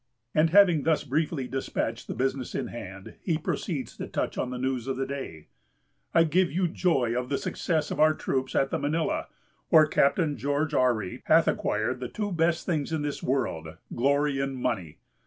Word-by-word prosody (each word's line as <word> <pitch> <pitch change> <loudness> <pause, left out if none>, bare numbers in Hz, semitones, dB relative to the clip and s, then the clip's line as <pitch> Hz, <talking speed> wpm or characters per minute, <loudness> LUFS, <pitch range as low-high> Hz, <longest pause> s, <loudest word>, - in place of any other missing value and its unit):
And 155 +1 +4
having 180 -4 +6
thus 160 +1 +1
briefly 150 -1 -1
despatched 135 +1 -3
the - - -4
business 130 +1 -2
in - - -2
hand, 95 -4 -8
he 165 -4 0
proceeds 155 - -3
to - - -5
touch - - -2
on 125 - -2
the 125 - -4
news 130 -1 -2
of 135 - -2
the 135 - -1
day: 130 - -6 0.7
"I - - +5
give 175 +3 +2
you 180 +1 +1
joy 145 -9 +1
of 125 0 -2
the 140 - 0
success 155 -3 -1
of - - -3
our 155 0 +5
troops 130 -3 -2
at 135 - +2
the - - 0
Manilla, 155 +3 -1 0.4
where 155 -1 +7
Captain 150 0 +2
George 145 +5 -1
Ourry 120 -8 +1
hath - - +5
acquired - - 0
the 125 - -4
two 205 -2 -3
best 165 -1 +1
things 155 -4 -1
in 160 -2 -1
this 145 -1 -3
world, 80 - -2 0.2
glory 140 +2 +1
and 135 0 -2
money. 95 -11 -2
140 Hz, 190 wpm, -27 LUFS, 125-160 Hz, 0.7 s, where